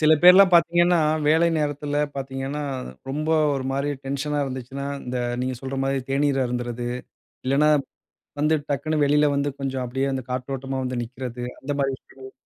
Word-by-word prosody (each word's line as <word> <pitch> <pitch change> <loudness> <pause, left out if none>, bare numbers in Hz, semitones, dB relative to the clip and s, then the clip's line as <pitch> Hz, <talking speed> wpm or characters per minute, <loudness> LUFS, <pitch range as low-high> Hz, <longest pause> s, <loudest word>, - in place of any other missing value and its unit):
சில 155 0 +5
பேர் 180 +1 +11
எல்லாம் 190 -1 +7
பார்த்தீங்கன்னா, 175 +1 +4 0.3
வேலை 165 +2 +4
நேரத்தில 145 0 -2 0.2
பார்த்தீங்கன்னா, 135 +2 -4 0.5
ரொம்ப 150 +3 -2 0.3
ஒருமாரி 135 +2 -1
டென்ஷன் 140 +2 -2
ஆ - - +2
இருந்துச்சுன்னா, 130 +1 -5 0.2
இந்த, 125 0 -3 0.2
நீங்க 130 0 -1
சொல்றமாரி 135 0 -1
தேநீர் 135 -1 +2
அருந்துறது, 120 0 -3 0.6
இல்லன்னா, 140 +3 +3 0.7
வந்து 150 +2 +3
டக்குனு 155 +3 -1
வெளில 150 +1 +4
வந்து 140 +1 0
கொஞ்சம் 135 -1 -2
அப்பிடியே 135 +3 -1
அந்த 130 -1 -3
காற்றோட்டமா 135 +1 -3
வந்து 125 -1 -2
நிற்கிறது, 125 0 -6 0.2
அந்த 140 - -4
மாதிரி 135 -1 +1
விஷயங்கள். 130 0 -14
135 Hz, 150 wpm, -24 LUFS, 130-150 Hz, 0.7 s, பேர்